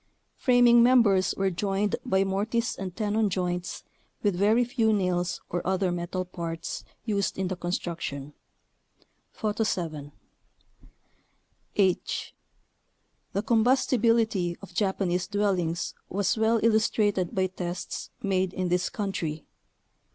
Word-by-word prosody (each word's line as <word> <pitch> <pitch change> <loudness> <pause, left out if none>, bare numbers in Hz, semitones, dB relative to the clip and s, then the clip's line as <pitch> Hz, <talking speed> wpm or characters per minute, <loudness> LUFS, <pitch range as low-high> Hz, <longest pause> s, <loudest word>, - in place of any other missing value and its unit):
Framing 245 -2 +5
members 230 -6 +4
were 195 0 +1
joined 195 +3 0
by 190 0 +2
mortise 215 +5 -1
and 185 -2 -6
tenon 215 0 +1
joints 180 -1 -2 0.4
with 205 -3 +2
very 215 +6 +3
few 235 -3 +1
nails 180 -3 0
or 175 - -1
other 190 0 +1
metal 175 +1 -3
parts 165 -2 -5 0.2
used 200 -3 -1
in 190 -1 -1
the 185 - -2
construction 170 -5 -4 1.0
(Photo 215 0 -1
7). 155 -8 -3 1.6
h. 190 -3 0 1.0
The 200 - 0
combustibility 230 -6 +2
of 195 - -11
Japanese 190 -3 0
dwellings 185 -5 0 0.2
was 195 0 +1
well 225 +1 +2
illustrated 210 -4 +2
by 190 -1 +2
tests 180 -1 -5
made 190 -2 +1
in 185 -1 -1
this 180 +1 +1
coun 205 -2 -3
try. 155 -4 -4
195 Hz, 115 wpm, -27 LUFS, 180-215 Hz, 1.6 s, Framing